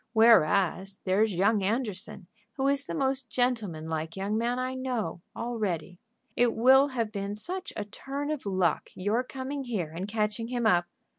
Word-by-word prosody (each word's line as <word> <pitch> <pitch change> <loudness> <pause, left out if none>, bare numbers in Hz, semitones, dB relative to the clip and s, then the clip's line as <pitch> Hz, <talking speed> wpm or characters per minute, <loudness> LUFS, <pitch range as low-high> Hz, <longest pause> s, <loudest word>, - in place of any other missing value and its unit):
"Whereas 195 -3 +4
there's 205 +3 +2
young 200 +4 +3
Anderson, 205 -2 -2 0.3
who 270 +1 0
is 280 0 +2
the - - -4
most 270 -3 0
gentleman 215 -10 0
like 160 0 -3
young 200 +2 -1
man 235 +2 0
I 255 0 -2
know, 255 -8 -3
all 235 0 -4
ready. 180 -3 -2 0.4
It 240 -1 +3
will 265 +4 +6
have 235 -6 -2
been 200 -1 -3
such 370 - -4
a 210 - -3
turn 275 +7 -5
of 295 -8 -4
luck 185 -5 +1
your 205 +6 +1
coming 270 +2 -5
here 195 -10 -2
and 175 +4 -5
catching 215 +1 -1
him 240 -1 -2
up." 175 -5 +4
220 Hz, 170 wpm, -28 LUFS, 195-255 Hz, 0.4 s, will